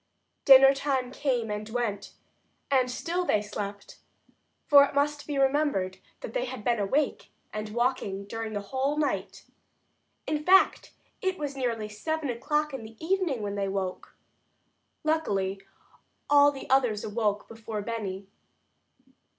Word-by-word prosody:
Dinner 270 0 +9
time 270 -2 -1
came 245 -6 -1
and 210 +1 -4
went, 220 -4 -3 0.6
and 255 -2 +3
still 340 +8 -2
they 215 -11 +2
slept, 205 -1 -7 0.7
for 285 -1 +8
it 280 - -2
must 290 +1 0
be 290 -2 -2
remembered 270 -9 +1 0.2
that - - -7
they - - -1
had 255 - -7
been 235 -1 +1
awake 270 +9 0 0.2
and 215 0 -4
walking 215 -4 -1
during 225 +1 -5
the 205 - -2
whole 265 +7 -1
night. 300 -1 -2 0.8
In 300 0 -2
fact, 380 +3 +4 0.3
it 375 -3 -1
was 290 -2 -4
nearly 235 -5 -2
seven 285 +7 -3
o'clock 295 +5 -1
in 265 - -5
the 220 0 -12
evening 330 - 0
when 200 -1 -3
they 200 -1 -1
awoke. 190 -1 -4 0.9
Luckily, 200 -12 0 0.7
all 290 0 +7
the 275 - -9
others 245 -6 +2
awoke 210 -1 -1
before 220 -2 -6
Benny. 200 -4 -4
250 Hz, 140 wpm, -28 LUFS, 210-290 Hz, 0.9 s, Dinner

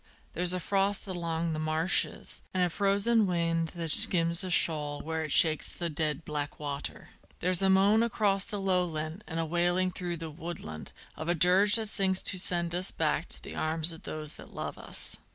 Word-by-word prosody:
there's 180 +1 0
a 180 - 0
frost 195 +3 0
along 170 -3 -3
the 155 - -3
marshes, 155 +4 0
And 185 - +2
a 175 - 0
frozen 200 +3 +2
wind 165 -2 0
that 165 -2 -3
skims 170 0 +5
the 185 - -3
shoal 150 -4 +2
where 160 0 -3
it 155 - -6
shakes 155 0 +4
the 170 -2 -5
dead 155 0 -2
black 145 -1 -5
water; 145 -1 -5 0.3
There's 180 0 +2
a 195 - +3
moan 200 +3 +4
across 205 -4 +1
the 205 - -5
lowland 180 -2 -2
and 165 0 -4
a 165 - 0
wailing 175 +3 +1
through 175 -1 -4
the 165 -1 -7
woodland 150 - -8 0.2
Of 155 +2 -6
a 175 - +2
dirge 185 +5 +5
that 220 -2 0
sings 190 -3 +1
to 185 - +4
send 175 -2 +1
us 180 +2 +1
back - - -1
to - - -4
the - - -8
arms 160 +1 0
of 165 - -10
those 155 -1 -5
that - - -14
love - - -5
us. - - -6
170 Hz, 195 wpm, -29 LUFS, 160-190 Hz, 0.3 s, skims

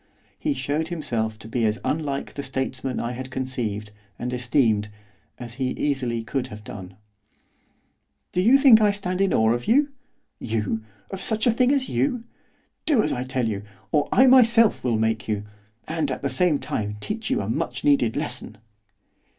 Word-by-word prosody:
He 295 -2 0
showed 155 - -1
himself 115 -10 -2
to 110 - -11
be 115 +1 -1
as 110 +1 +1
unlike 145 -3 -2
the 140 - -4
statesman 130 -1 -3
I 120 - -2
had 130 +1 -6
conceived, 120 -6 -3 0.3
and 125 +1 -4
esteemed, 120 -4 +1 0.5
as 120 -1 -8
he 130 - +1
easily 125 -5 -1
could 125 +4 -2
have 105 -4 -10
done. 95 -3 -9 1.4
'Do 180 - +1
you 240 +8 +6
think 265 -6 +7
I 210 - +5
stand 195 -2 -2
in 195 -1 +3
awe 110 +1 +3
of 120 0 -4
you? 280 +6 +4 0.5
you! 110 -1 -2 0.3
of 190 - -5
such 220 +1 +1
a 240 - +5
thing 250 +3 +3
as 275 -3 +1
you! 140 - 0 0.6
Do 275 -9 +4
as - - 0
I 125 - -2
tell 130 -2 -1
you, 100 -3 -2 0.3
or 145 - +2
I 260 - +6
myself 235 -4 +5
will 120 -3 +1
make 110 0 0
you, 105 -2 -1 0.4
and, 155 -2 -1
at 130 - -4
the 140 - +1
same 155 +3 +3
time, 105 -6 -3
teach 220 - -4
you - - +1
a 100 - -3
much 125 +3 -2
needed 140 -6 +3
lesson. 125 -7 -4
130 Hz, 180 wpm, -24 LUFS, 115-185 Hz, 1.4 s, think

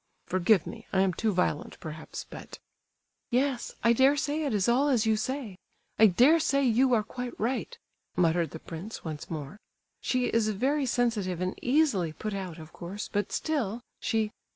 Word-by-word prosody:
Forgive 185 +1 +3
me, 225 -1 -9
I 190 - +3
am 190 -1 +2
too 220 +5 0
violent, 180 -5 -1
perhaps, 155 -1 -7
but—" - - -10 0.7
"Yes—I 250 -2 +1
dare 270 +4 +4
say 300 +1 -1
it 280 - 0
is 205 -4 +1
all 255 +5 +3
as 240 -5 +3
you 220 -1 +3
say; 225 -3 -3 0.4
I 220 - +9
dare 255 - +5
say 280 -3 +2
you 250 +1 +4
are 215 - +2
quite 250 +3 -6
right," 260 - -2 0.4
muttered 170 -1 +2
the - - -7
prince 175 +7 -8
once 155 -2 -6
more. 155 +4 -6 0.4
"She 255 -1 +1
is 225 -2 +1
very 265 +7 +1
sensitive 220 -8 0
and 185 0 -1
easily 245 - +2
put 215 +5 -4
out, 185 -4 -5
of 155 -1 -11
course; 190 +4 -6
but 205 -1 0
still, 245 -8 -1 0.2
she..." 220 -1 0
220 Hz, 175 wpm, -29 LUFS, 185-255 Hz, 0.7 s, I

